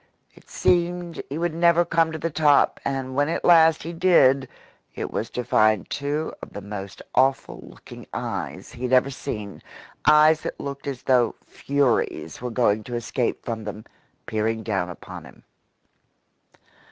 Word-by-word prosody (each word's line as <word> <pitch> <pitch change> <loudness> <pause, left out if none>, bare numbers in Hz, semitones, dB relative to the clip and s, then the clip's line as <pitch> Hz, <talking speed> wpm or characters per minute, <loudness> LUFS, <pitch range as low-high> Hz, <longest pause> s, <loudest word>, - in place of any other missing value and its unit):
It - - -21
seemed 175 -1 0
he 140 - -4
would 170 0 -1
never 170 +1 +4
come 165 -1 +2
to 160 - -4
the 165 +2 -3
top, 150 -2 +3
and 135 -1 -3
when 145 +3 +1
at 165 - -2
last 165 -2 +6
he 170 - -6
did 140 -7 +4 0.5
it - - -4
was - - -3
to 125 - -4
find 110 -2 +2
two 145 +2 -2
of - - -10
the 100 - -6
most 100 -1 -8
awful 135 +1 +1
looking - - -13
eyes - - -5
he - - -12
had 130 0 -1
ever 130 +2 +4
seen 105 -6 -6 0.5
eyes 155 +1 +6
that - - -6
looked 140 0 -6
as 135 -3 -5
though 125 -3 +2
furies 135 - -1
were 125 - -3
going 110 -3 +1
to 120 - -5
escape 120 +1 -2
from 115 -2 -4
them 105 +1 -7 0.4
peering 110 +1 -1
down 95 -5 -1
upon 90 - -9
him. - - -16
135 Hz, 165 wpm, -24 LUFS, 115-160 Hz, 0.5 s, last